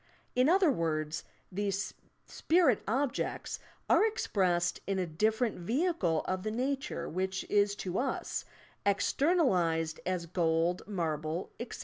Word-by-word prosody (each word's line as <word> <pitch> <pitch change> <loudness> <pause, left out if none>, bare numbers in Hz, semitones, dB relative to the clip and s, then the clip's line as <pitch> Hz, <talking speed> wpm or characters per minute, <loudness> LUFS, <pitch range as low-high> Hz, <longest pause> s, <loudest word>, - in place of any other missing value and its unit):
In 255 +3 +4
other 365 -3 +5
words, 155 - -1 0.3
these 200 +1 -2 0.3
spirit 320 - +2
objeefs 260 +4 -1 0.3
are - - +5
expressed 185 - +1
in 195 -1 0
a 185 - 0
different 215 +8 0
vehicle 220 - +1
of 185 0 -1
the 215 - -2
nature 260 - -2
which 190 +3 -2
is 205 0 +3
to 185 -2 -3
us, 265 +1 -2 0.4
ex 200 0 +2
ternalized 180 - +2
as 180 -2 -1
gold, 170 0 +1
marble, 160 -3 -2
etc. 235 - -6
195 Hz, 125 wpm, -31 LUFS, 170-250 Hz, 0.4 s, other